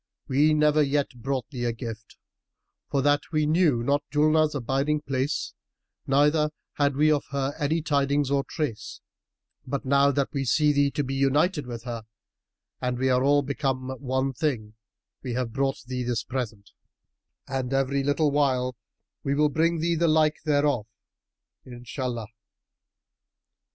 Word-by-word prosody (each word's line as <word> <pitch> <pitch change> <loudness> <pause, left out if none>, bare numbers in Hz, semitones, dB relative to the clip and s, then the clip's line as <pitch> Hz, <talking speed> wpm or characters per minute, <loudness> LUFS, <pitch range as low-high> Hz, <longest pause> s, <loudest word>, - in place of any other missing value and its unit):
We 150 +4 +3
never 150 0 +4
yet 140 -4 -1
brought 135 -2 -2
thee 125 -3 -3
a 120 - +1
gift, 115 -2 -8 0.7
for 140 -2 0
that 145 0 +3
we 155 -1 +1
knew 155 -6 +3
not 140 +3 +2
Julnar's 155 +1 +3
abiding 140 +3 0
place 135 0 -2 0.5
neither 150 +3 +3 0.2
had 145 -1 +1
we 155 +2 +4
of 145 -2 +1
her 140 0 -1
any 155 +2 0
tidings 140 -2 +1
or 140 -1 +2
trace; 145 -10 -4 0.7
but 140 +2 -3
now 140 +1 +4
that 140 -1 0
we 140 -2 -1
see 150 +3 +3
thee 140 0 +3
to 145 +1 -2
be 135 0 -4
united 145 +3 +1
with 120 -2 -6
her 115 -3 -6 0.8
and 125 -1 -1
we 130 +1 +1
are 125 0 +3
all 145 +1 +4
become 135 -2 -2
one 130 0 -1
thing, 120 -7 -2 0.5
we 125 -3 -4
have 120 -2 -2
brought 135 0 -1
thee 125 0 -3
this 120 -3 -1
present; 110 -6 -5 0.8
and 130 -2 -3
every 135 0 +1
little 145 +2 +2
while 130 -3 +1 0.5
we 140 - 0
will 150 +1 +3
bring 165 +2 +1
thee 170 +1 +1
the 170 +1 +2
like 155 -1 +3
thereof, 145 -7 +1 0.8
Inshallah! 120 -2 -5
140 Hz, 150 wpm, -26 LUFS, 130-150 Hz, 0.8 s, never